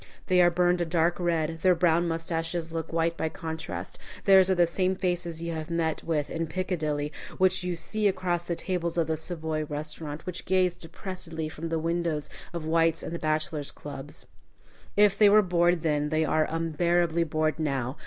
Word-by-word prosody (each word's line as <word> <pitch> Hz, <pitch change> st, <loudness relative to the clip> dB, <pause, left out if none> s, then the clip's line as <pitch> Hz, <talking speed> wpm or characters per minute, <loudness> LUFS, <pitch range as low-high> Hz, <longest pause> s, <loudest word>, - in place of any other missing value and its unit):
They 180 Hz, -1 st, +4 dB
are 175 Hz, -, +6 dB
burned 175 Hz, 0 st, +2 dB
a -, -, +1 dB
dark 170 Hz, +1 st, +1 dB
red; 165 Hz, -2 st, 0 dB
their 185 Hz, -1 st, +5 dB
brown 170 Hz, 0 st, +3 dB
mustaches 165 Hz, 0 st, -2 dB
look 165 Hz, -1 st, -4 dB
white 165 Hz, 0 st, +1 dB
by 160 Hz, -, -1 dB
contrast, 160 Hz, +2 st, -6 dB, 0.3 s
theirs 190 Hz, -1 st, +7 dB
are 190 Hz, -, +3 dB
the 175 Hz, -1 st, +5 dB
same 185 Hz, +2 st, 0 dB
faces 175 Hz, -3 st, -2 dB
you 170 Hz, 0 st, -3 dB
have 160 Hz, 0 st, -5 dB
met 165 Hz, -2 st, -1 dB
with 155 Hz, -3 st, -1 dB
in 165 Hz, 0 st, -2 dB
Piccadilly, 155 Hz, -4 st, -2 dB, 0.2 s
which 185 Hz, 0 st, +3 dB
you 180 Hz, -1 st, -1 dB
see 205 Hz, +6 st, -1 dB
across 180 Hz, -3 st, -1 dB
the 175 Hz, -, -2 dB
tables 175 Hz, -1 st, -2 dB
of 165 Hz, -, +3 dB
the 160 Hz, +1 st, -1 dB
Savoy 160 Hz, -1 st, -3 dB
restaurant, 150 Hz, 0 st, -5 dB
which 180 Hz, -1 st, -5 dB
gaze 185 Hz, -2 st, +2 dB
depressedly 165 Hz, -2 st, -5 dB
from 165 Hz, +2 st, -5 dB
the 165 Hz, -, 0 dB
windows 165 Hz, -2 st, -1 dB, 0.2 s
of 170 Hz, -2 st, -5 dB
White's 165 Hz, 0 st, +2 dB
and -, -, -5 dB
the 170 Hz, -, -3 dB
Bachelors' 155 Hz, -1 st, -1 dB
Club. 145 Hz, 0 st, -8 dB, 0.9 s
If 205 Hz, -1 st, +5 dB
they 210 Hz, -1 st, +8 dB
were 210 Hz, +1 st, +6 dB
bored 175 Hz, -2 st, +2 dB
then, 150 Hz, -2 st, +1 dB
they 155 Hz, 0 st, +1 dB
are 155 Hz, 0 st, +2 dB
unbearably 170 Hz, +1 st, +1 dB
bored 155 Hz, 0 st, 0 dB
now. 135 Hz, -4 st, -1 dB
165 Hz, 185 wpm, -27 LUFS, 160-175 Hz, 0.9 s, they